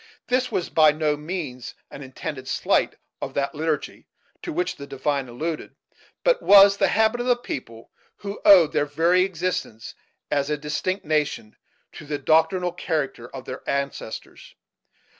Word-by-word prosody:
This 255 +1 +1
was 175 - -2
by 155 0 +5
no 150 0 0
means 150 -5 -6 0.2
an - - -9
intended 130 0 -7
slight - - +1 0.3
of - - -5
that 140 +2 -1
liturgy 155 -1 -3 0.3
to 340 - -5
which 350 +3 -2
the 140 - -9
divine 135 -1 -2
alluded, 155 +6 -5 0.5
but - - +3
was 200 0 +8
the - - +3
habit 220 +2 +2
of 245 - -3
a 245 - +4
people 115 - -8 0.2
who 200 0 -7
owed 180 -7 +7
their 145 - +1
very 165 +5 +3
existence, 180 - -3 0.4
as 140 -1 0
a 150 - 0
distinct 160 +6 -3
nation, 150 -8 -1 0.4
to 150 - -11
the 145 0 -2
doctrinal 160 +4 +2
character 150 -8 -3
of 130 -1 -9
their 130 - -7
ancestors. 140 -5 -5
155 Hz, 155 wpm, -24 LUFS, 140-185 Hz, 0.5 s, was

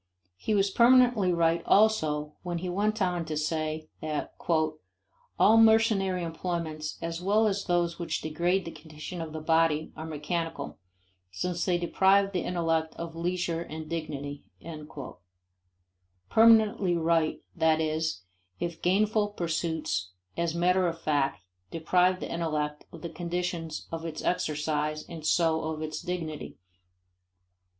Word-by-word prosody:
He 215 - -1
was 195 -1 +2
permanently 240 -4 +5
right 170 -1 +2
also 155 -9 +3
when 175 -1 -3
he 180 +2 -4
went 210 +3 0
on 180 -2 0
to 155 -1 -3
say 155 0 -2
that 155 -1 -3 1.0
"all 220 +2 +6
mercenary 220 -5 +4
employments 165 -2 -4
as 165 +1 -3
well 210 +4 +3
as 200 -1 0
those 175 -1 0
which 165 -2 -2
degrade 175 +4 0
the 165 - -5
condition 155 +2 -8
of 160 -1 -5
the 155 - -5
body 160 -1 +2
are 160 - -6
mechanical, 160 +2 -4 0.5
since 170 - -2
they 180 -2 +2
deprive 195 +3 +3
the 180 -3 -1
intellect 165 -2 -1
of 165 -1 -6
leisure 170 -1 -1
and 160 -1 -7
dignity," 145 -3 -4 1.9
permanently 220 -5 +5
right, 165 -1 +1
that 160 -1 +3
is, 155 - -1 0.4
if 170 -1 -4
gainful 205 +3 +2
pursuits 160 - -2 0.2
as 170 -1 -1
matter 180 +1 +3
of 165 -1 -3
fact 145 - 0 0.3
deprive 180 +3 +2
the - - -5
intellect 150 -3 -2
of - - -11
the 170 - -4
conditions 170 -2 -4
of 165 0 -4
its 160 -2 -5
exercise 150 -2 -1
and 160 -3 -6
so 160 -1 +3
of 155 0 -3
its 155 0 -4
dignity. 170 -4 -5
170 Hz, 135 wpm, -28 LUFS, 155-180 Hz, 1.9 s, all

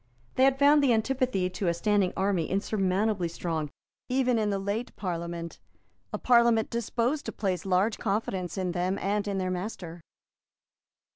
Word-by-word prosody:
They 260 - +4
had 270 0 +3
found 290 +1 +6
the 255 -4 +4
antipathy 240 -4 +1
to 185 +1 -3
a 170 - +2
standing 200 0 +2
army 190 -4 0
insurmountably 195 -1 0
strong 165 -2 -3 0.4
even 250 -2 +2
in 210 -1 +1
the 200 - 0
late 200 +5 -3
Parliament, 170 -2 -5 0.5
a - - -2
Parliament 235 -2 +3
disposed 235 +5 -1
to - - -2
place 190 -3 -2
large 190 +4 +2
confidence 195 -3 -2
in 185 -2 -1
them 180 +2 -1
and 205 +1 -1
in 200 -1 -1
their 185 -1 -1
master. 180 -3 -5
200 Hz, 155 wpm, -28 LUFS, 180-230 Hz, 0.5 s, found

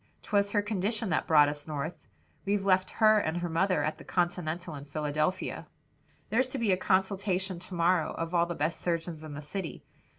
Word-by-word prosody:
'Twas 200 -1 +2
her 205 -1 +2
condition 210 +1 -1
that 160 - 0
brought 150 -2 +6
us 145 +1 -4
North. 155 +2 -5 0.4
We've 200 0 0
left 185 -1 +3
her 215 -1 +5
and 160 -3 -1
her 175 0 -2
mother 170 -1 +2
at 155 +1 -2
the - - -10
Continental 175 -1 -1
in 140 -1 -8
Philadelphia. 155 +4 -2 0.6
"There's 255 +4 +2
to 270 - -4
be 230 -5 +1
a - - +5
consultation 190 -1 0
to 180 +1 -8
morrow 170 -1 +2
of 165 +1 -4
all 170 -1 +3
the 175 - -3
best 155 +3 -1
surgeons 165 -2 -2
in 155 -2 -7
the 150 - -7
city. 170 +3 -5
175 Hz, 195 wpm, -30 LUFS, 155-195 Hz, 0.6 s, brought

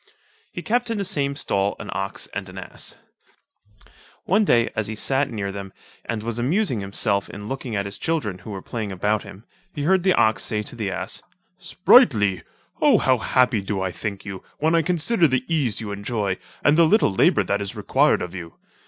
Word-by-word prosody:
He - - -6
kept 245 +1 0
in 225 - -1
the 200 - -1
same 140 -7 -1
stall 100 -7 0
an - - -7
ox 95 +1 -4
and 100 -1 -5
an 95 - -11
ass. 95 - -7 1.3
One 200 +5 +3
day 120 - +3
as 110 - -1
he 110 - -4
sat 135 +5 +1
near 105 -4 -3
them, 95 -1 -7 0.3
and 115 -2 -3
was 115 0 -2
amusing 140 - +1
himself 100 +1 -1
in 105 +1 -8
looking 130 -2 -4
at 100 -1 -1
his 100 - -6
children 115 - -2
who - - -11
were 95 -2 -6
playing 110 -4 -4
about 105 +3 0
him, 100 +5 -12 0.3
he 145 - -3
heard 190 +4 +3
the 185 0 +3
ox 110 0 +3
say 105 -1 -2
to 115 - -8
the 105 -4 -2
ass, 95 - -5 0.4
"Sprightly, 105 -4 +4 0.4
O! - - +6
how 130 -1 +2
happy 125 -3 +2
do 95 -1 -2
I 95 - -1
think 100 +1 -5
you, 95 -2 -7
when 160 +2 +1
I 165 - +4
consider 175 +2 +2
the 130 -2 0
ease 145 -10 0
you 105 -2 -5
enjoy, 100 -1 -2 0.2
and 150 +3 +4
the 165 - +7
little 210 - +3
labour - - +4
that 100 +1 -1
is 100 - -4
required - - +2
of 90 - -6
you. 85 -3 -8
110 Hz, 205 wpm, -23 LUFS, 100-145 Hz, 1.3 s, the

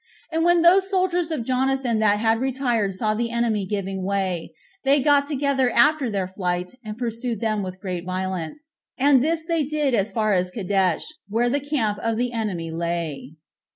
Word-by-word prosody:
And 325 0 +1
when 345 0 +4
those 375 +3 +5
soldiers 365 -3 +1
of 310 -7 -2
Jonathan 260 -2 +1
that 210 -1 +3
had 225 0 +2
retired 245 -6 0
saw 215 +1 0
the 230 +2 -1
enemy 230 -4 0
giving 195 -1 -3
way, 190 -3 -2 0.3
they 280 +1 +4
got 285 +1 +3
together 280 -3 +1
after 275 +2 +3
their 195 -3 -1
flight, 180 0 -3
and 215 0 -7
pursued 235 -1 -3
them 215 -2 0
with 185 -1 -6
great 180 -3 -4
violence; 185 - -4 0.3
and 270 -1 +4
this 320 +1 0
did 325 -4 0
they 300 -4 +1
as 205 0 0
far 215 0 +1
as 180 -1 +1
Cadesh, 190 -3 0 0.3
where 235 +3 +1
the 285 - +1
camp 260 -8 -1
of 225 0 -1
the 245 +1 0
enemy 195 -8 -3
lay. 165 -4 -3
230 Hz, 180 wpm, -23 LUFS, 190-275 Hz, 0.3 s, those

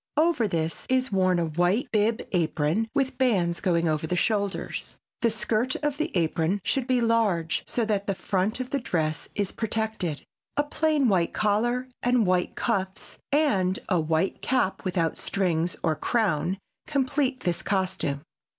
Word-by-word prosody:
Over 310 -8 +3
this 165 -3 -2
is 255 -1 +2
worn 185 -2 +3
a 170 - +1
white 175 - +1
bib 220 +1 +2
apron 170 +3 +1
with 270 -2 0
bands 185 -10 +2
going 170 -3 +2
over 155 0 0
the 180 - 0
shoulders. 200 0 -1 0.2
The 235 - +4
skirt 225 +3 0
of 295 -1 0
the 310 - -1
apron 165 +3 +1
should 265 -2 0
be 255 -2 +2
large 210 -9 +2
so 235 - 0
that 205 -2 -1
the 195 - 0
front 195 +5 -1
of 255 0 -4
the 280 - +1
dress 155 - -2
is 200 -2 -1
protected. 220 -8 -2 0.3
A 290 - +4
plain 300 -2 +1
white 180 -6 +2
collar 240 +5 +1
and 245 -2 +3
white 180 -1 +1
cuffs 190 -5 -2
and 200 -12 +2
a 180 -4 +3
white 160 +3 0
cap 245 -7 0
without 175 -3 0
strings 175 -3 0
or 160 -2 +2
crown 190 - 0 0.3
complete 270 -2 0
this 175 -5 -1
costume. 185 -8 -1
200 Hz, 160 wpm, -26 LUFS, 175-245 Hz, 0.3 s, The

